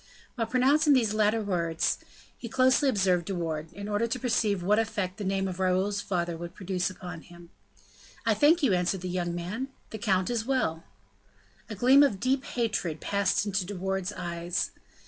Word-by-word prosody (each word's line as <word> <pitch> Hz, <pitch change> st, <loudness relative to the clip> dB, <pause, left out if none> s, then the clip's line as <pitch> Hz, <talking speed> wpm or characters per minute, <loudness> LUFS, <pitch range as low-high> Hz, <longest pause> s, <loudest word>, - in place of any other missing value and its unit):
While 230 Hz, -3 st, -2 dB
pronouncing 285 Hz, +5 st, +4 dB
these 230 Hz, -5 st, +2 dB
latter 215 Hz, +1 st, +2 dB
words, 170 Hz, -5 st, 0 dB, 0.4 s
he 235 Hz, -, -8 dB
closely 260 Hz, +4 st, +3 dB
observed 190 Hz, -6 st, +2 dB
De 195 Hz, -, -3 dB
Wardes, 160 Hz, -2 st, -3 dB
in 200 Hz, +2 st, -7 dB
order 210 Hz, +2 st, 0 dB
to 255 Hz, +2 st, -2 dB
perceive 220 Hz, -6 st, 0 dB
what 210 Hz, +4 st, +3 dB
effect 205 Hz, -4 st, -2 dB
the 210 Hz, -, -5 dB
name 195 Hz, 0 st, 0 dB
of 185 Hz, 0 st, -5 dB
Raoul's 190 Hz, +2 st, +1 dB
father 175 Hz, -3 st, -2 dB
would 170 Hz, +1 st, -8 dB
produce 185 Hz, -1 st, -2 dB
upon 180 Hz, -3 st, -8 dB
him. 175 Hz, 0 st, -15 dB, 0.7 s
"I -, -, +4 dB
thank 315 Hz, +3 st, +4 dB
you," 240 Hz, -8 st, +4 dB
answered 180 Hz, +1 st, 0 dB
the 185 Hz, -, -4 dB
young 175 Hz, -1 st, -2 dB
man, 195 Hz, +10 st, -4 dB, 0.2 s
"the 220 Hz, -, -6 dB
count 190 Hz, -1 st, +1 dB
is 235 Hz, -2 st, 0 dB
very 265 Hz, +4 st, 0 dB
well." 160 Hz, -9 st, -1 dB, 0.9 s
A 215 Hz, -, -5 dB
gleam 255 Hz, +7 st, +6 dB
of 235 Hz, -10 st, +3 dB
deep 260 Hz, +4 st, +1 dB
hatred 215 Hz, -9 st, -2 dB
passed 200 Hz, 0 st, +1 dB
into 200 Hz, -2 st, 0 dB
De 200 Hz, +3 st, -6 dB
Wardes's 190 Hz, +1 st, -2 dB
eyes. 175 Hz, 0 st, -2 dB
195 Hz, 185 wpm, -28 LUFS, 180-230 Hz, 0.9 s, gleam